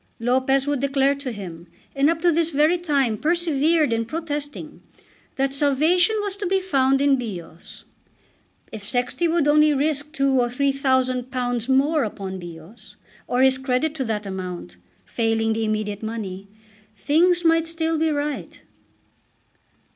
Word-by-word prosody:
Lopez 260 +3 +1
would 290 -2 -1
declare 275 0 +2
to 280 -2 -5
him, 175 -5 -9 0.3
and 275 +2 +3
up 330 0 -2
to 350 - +5
this 330 0 +1
very 310 +3 +2
time 275 -10 0
persevered 320 -3 +1
in 230 0 0
protesting, 295 +1 -5 0.5
that 270 0 0
salvation 310 +8 +3
was 405 -2 -3
to 400 -2 -3
be 385 +1 +2
found 275 -7 +1
in 280 -1 +4
Bios. 180 -9 -8 0.9
If 220 -2 -8
Sexty 250 +9 -1
would 330 -3 +1
only 300 0 +4
risk 290 +1 -1
two 275 -4 +2
or 240 - 0
three 275 +3 +1
thousand 260 -2 0
pounds 245 -2 -2
more 285 +3 +3
upon 195 -3 -5
Bios, 175 +5 -12 0.3
or 250 +1 +2
his 265 0 +4
credit 265 +3 0
to 290 -4 -3
that 215 -2 -3
amount, 180 - -6 0.3
failing 225 -1 0
the 225 0 -1
immediate 215 -1 -2
money, 205 -4 -6 0.5
things 345 +8 +2
might 330 0 +3
still 325 -1 -1
be 320 0 +2
right. 295 -1 -3
275 Hz, 150 wpm, -22 LUFS, 230-310 Hz, 0.9 s, to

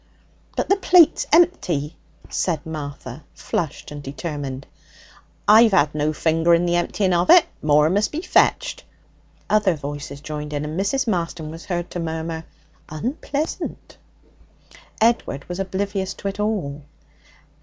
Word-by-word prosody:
'But - - 0
the 395 - +3
plate's 360 -4 +5
empty,' 180 - +2 0.3
said 165 -5 -2
Martha, 145 -3 -7
flushed 160 -3 -4
and 145 0 -7
determined. 140 -2 -5 0.8
'I've 220 0 +7
had 145 -3 +3
no 150 0 0
finger 165 +2 +3
in 170 +1 +1
the 175 0 +1
emptying 185 +2 0
of 175 +1 +1
it. 355 -2 +8 0.2
More 150 0 +4
must 205 +5 +1
be 300 - -3
fetched.' - - +2 0.6
Other 210 -4 +3
voices 145 -1 -6
joined 150 0 -6
in, 145 0 -2
and 155 +4 -4
Mrs. 205 +8 0
Marston 170 -5 -2
was 165 +1 -10
heard 175 -2 -3
to 180 - -4
murmur, 160 0 -4 0.4
'Unpleasant.' 280 - -4 1.0
Edward 225 -11 +1
was 180 +1 -5
oblivious 195 0 -2
to - - -6
it 195 - -8
all. 190 -10 -2
170 Hz, 135 wpm, -22 LUFS, 150-200 Hz, 1.0 s, it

